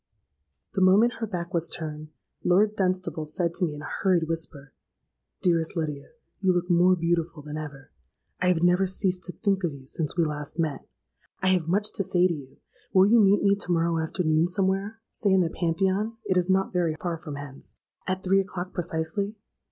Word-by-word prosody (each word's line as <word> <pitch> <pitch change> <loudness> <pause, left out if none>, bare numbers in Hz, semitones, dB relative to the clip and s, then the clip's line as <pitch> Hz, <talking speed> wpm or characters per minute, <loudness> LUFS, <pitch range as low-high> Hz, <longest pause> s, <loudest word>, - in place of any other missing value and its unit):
"The 190 - 0
moment 205 +6 +5
her 225 - -2
back 180 -2 -5
was 170 -1 0
turned, 155 -1 -5 0.3
Lord 205 +4 +3
Dunstable 185 -5 -1
said 170 +2 -1
to 180 - 0
me 150 -3 -4
in 145 - -8
a - - -6
hurried 180 -4 +2
whisper, 160 -4 -5 0.7
'Dearest 170 -1 +1
Lydia, 150 -3 -3 0.3
you 190 -2 +3
look 175 +1 0
more 180 +2 +5
beautiful 170 -2 -1
than 150 0 -7
ever! 145 -3 -8 0.5
I 180 - +1
have 175 -2 +2
never 180 +2 +4
ceased 185 -1 0
to 180 - -6
think 195 -1 -1
of 165 -4 0
you 135 -1 -13
since 150 +4 -3
we 170 - +3
last 150 0 -5
met. 155 -4 -2 0.6
I 190 - +4
have 180 -4 +2
much 205 +4 +1
to 195 - -1
say 180 -1 +3
to 175 - -1
you: 135 -4 -10 0.3
will 190 0 +6
you 230 +3 +5
meet 200 0 +4
me 200 0 +4
to 180 - -3
morrow 165 -1 +1
afternoon, 160 0 +1
somewhere? 195 +3 0
Say 200 -3 +1
in 190 - +5
the 165 -2 0
Pantheon, 190 +6 0
(it 185 - +1
is 180 0 +1
not 190 0 +2
very 170 -3 +1
far 170 -2 -3
from 155 -4 -7
hence) 140 -1 -10 0.3
at 185 0 -1
three 195 +1 +3
o'clock 185 -1 -6
precisely?' 175 +5 -2
175 Hz, 200 wpm, -26 LUFS, 160-190 Hz, 0.7 s, will